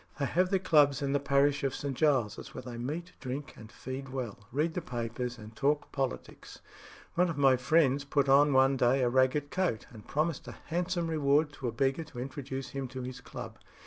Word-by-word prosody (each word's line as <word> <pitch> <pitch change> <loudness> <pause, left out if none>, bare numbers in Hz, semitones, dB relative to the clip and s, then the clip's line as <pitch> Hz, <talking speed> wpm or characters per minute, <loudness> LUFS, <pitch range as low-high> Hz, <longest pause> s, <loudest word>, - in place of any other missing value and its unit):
They 140 - 0
have 180 +5 +1
their 195 - +3
clubs 145 -6 +4
in 140 0 0
the 145 - +3
parish 140 +1 +2
of 135 -1 0
St. 140 -2 -3
Giles's, 130 -8 0
where 130 - -6
they 120 -1 -7
meet, 155 +9 -4
drink 140 +3 -5
and 110 0 -12
feed 135 +1 -7
well, 130 -5 -5
read 155 +6 0
the 180 - -2
papers, 120 -1 -4
and 110 0 -11
talk 145 +4 0
politics. 135 -2 -4 0.5
One 175 +1 +2
of 160 - -4
my 135 -2 +5
friends 140 +1 +3
put 140 -1 +1
on 145 +2 +6
one 135 0 +4
day 125 +2 +3
a 120 - +3
ragged 130 +3 +2
coat, 180 - -1
and 110 -4 -13
promised 155 0 -1
a - - -8
handsome 175 0 -1
reward 150 -1 +2
to 135 -3 -5
a - - -1
beggar 135 +6 0
to 135 -5 -10
introduce 135 0 -5
him 135 0 -4
to 130 0 -6
his 125 0 -7
club. - - -8
140 Hz, 210 wpm, -30 LUFS, 130-150 Hz, 0.5 s, on